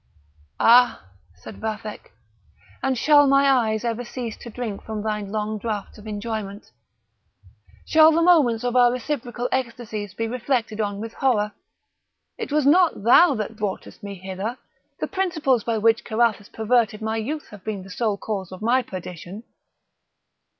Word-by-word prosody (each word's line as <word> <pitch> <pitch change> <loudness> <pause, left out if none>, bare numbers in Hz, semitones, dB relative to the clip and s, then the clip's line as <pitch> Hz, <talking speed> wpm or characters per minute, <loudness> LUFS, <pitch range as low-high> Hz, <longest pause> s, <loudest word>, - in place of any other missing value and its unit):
"Ah!" 245 +1 +5 0.3
said 90 - -11
Vathek; 215 -1 -5 0.7
"and 265 -1 0
shall 290 +2 +5
my 275 0 +4
eyes 230 -5 +2
ever 235 +1 -2
cease 240 -2 -6
to 240 - -10
drink 225 -3 -5
from 215 -1 -5
thine 210 -2 -3
long 215 0 -2
draughts 210 -1 -5
of 210 - -12
enjoyment! 210 -1 -5 1.1
Shall 315 0 +6
the 335 +1 +2
moments 285 -11 +4
of 245 0 -1
our 245 -1 +6
reciprocal 245 -1 -3
ecstasies 225 -6 -3
be 225 +1 -2
reflected 230 -2 -1
on 205 -1 -2
with 225 +1 -6
horror? 215 -6 +1 0.9
It 445 - -5
was 300 -1 +2
not 330 - +4
thou 275 +6 +6
that 215 0 -4
broughtest 210 +1 -5
me 200 -1 -7
hither; 190 +6 -5 0.4
the - - -1
principles 315 - 0
by 230 -1 -1
which 225 +1 +3
Carathis 220 -2 0
perverted 225 -1 +1
my 220 +1 -1
youth 290 +8 -4
have 205 -3 -12
been 210 -3 -4
the 190 - -12
sole 215 -1 -1
cause 195 -3 -4
of 185 +3 -9
my 245 +3 +3
perdition!" 185 0 -8
225 Hz, 155 wpm, -23 LUFS, 210-250 Hz, 1.1 s, Shall